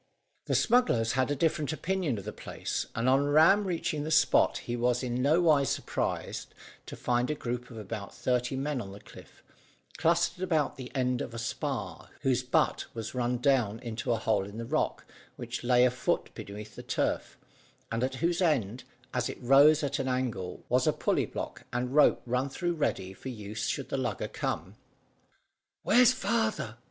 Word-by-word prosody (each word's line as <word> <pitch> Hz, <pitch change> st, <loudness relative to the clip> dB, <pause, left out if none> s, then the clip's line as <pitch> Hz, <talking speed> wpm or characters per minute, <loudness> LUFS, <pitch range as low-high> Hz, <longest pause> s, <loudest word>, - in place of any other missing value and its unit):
The -, -, 0 dB
smugglers 220 Hz, -, +3 dB
had 130 Hz, 0 st, +1 dB
a 145 Hz, -, 0 dB
different 150 Hz, -1 st, 0 dB
opinion 165 Hz, -, -1 dB
of 100 Hz, -, -6 dB
the 105 Hz, -, -5 dB
place, -, -, -4 dB
and 115 Hz, +1 st, 0 dB
on 135 Hz, +2 st, +4 dB
Ram 160 Hz, +8 st, +5 dB
reaching 160 Hz, -4 st, -2 dB
the 155 Hz, -, -3 dB
spot 155 Hz, -1 st, +4 dB
he 120 Hz, -, -4 dB
was 125 Hz, +1 st, +1 dB
in 125 Hz, 0 st, -1 dB
nowise 150 Hz, -1 st, +4 dB
surprised -, -, -3 dB, 0.3 s
to -, -, -7 dB
find 120 Hz, +1 st, 0 dB
a 150 Hz, -, 0 dB
group 125 Hz, -3 st, -4 dB
of 115 Hz, -, -10 dB
about 105 Hz, -1 st, -6 dB
thirty 125 Hz, +1 st, -1 dB
men 140 Hz, -1 st, -2 dB
on 95 Hz, -3 st, -8 dB
the 100 Hz, -, -10 dB
cliff, -, -, -15 dB, 0.6 s
clustered 170 Hz, +2 st, +2 dB
about 160 Hz, -6 st, +1 dB
the 130 Hz, -2 st, -8 dB
end 125 Hz, -1 st, +1 dB
of 115 Hz, -, -6 dB
a -, -, -4 dB
spar, 115 Hz, -, -4 dB
whose 130 Hz, -2 st, +2 dB
butt 125 Hz, 0 st, +1 dB
was 110 Hz, -1 st, -5 dB
run 125 Hz, -1 st, 0 dB
down 120 Hz, -5 st, +2 dB
into 115 Hz, +1 st, -3 dB
a 115 Hz, -, +2 dB
hole 110 Hz, -2 st, +1 dB
in 100 Hz, +2 st, -9 dB
the 115 Hz, -, -4 dB
rock, 155 Hz, +6 st, -1 dB, 0.3 s
which -, -, -6 dB
lay 125 Hz, 0 st, +5 dB
a 125 Hz, -, +3 dB
foot 125 Hz, -, -1 dB
beneath 105 Hz, +1 st, -8 dB
the -, -, -7 dB
turf, -, -, -2 dB, 0.5 s
and 115 Hz, +2 st, -1 dB
at 130 Hz, 0 st, -1 dB
whose 170 Hz, +5 st, 0 dB
end, 125 Hz, -, +1 dB, 0.3 s
as 125 Hz, -1 st, 0 dB
it -, -, -6 dB
rose 145 Hz, +5 st, +6 dB
at 140 Hz, -1 st, -1 dB
an 135 Hz, -, -1 dB
angle, 125 Hz, -8 st, -3 dB
was -, -, +2 dB
a -, -, +4 dB
pulley -, -, 0 dB
block -, -, -6 dB
and 125 Hz, +1 st, -2 dB
rope 150 Hz, -, +5 dB
run 125 Hz, +3 st, 0 dB
through 175 Hz, +5 st, -2 dB
ready 95 Hz, -, -2 dB
for 130 Hz, -, -8 dB
use 110 Hz, -3 st, -5 dB
should -, -, -3 dB
the -, -, -1 dB
lugger -, -, -2 dB
come. -, -, -4 dB, 1.1 s
"Where's 245 Hz, +3 st, +6 dB
father?" 220 Hz, -, -1 dB
125 Hz, 185 wpm, -29 LUFS, 115-150 Hz, 1.1 s, rose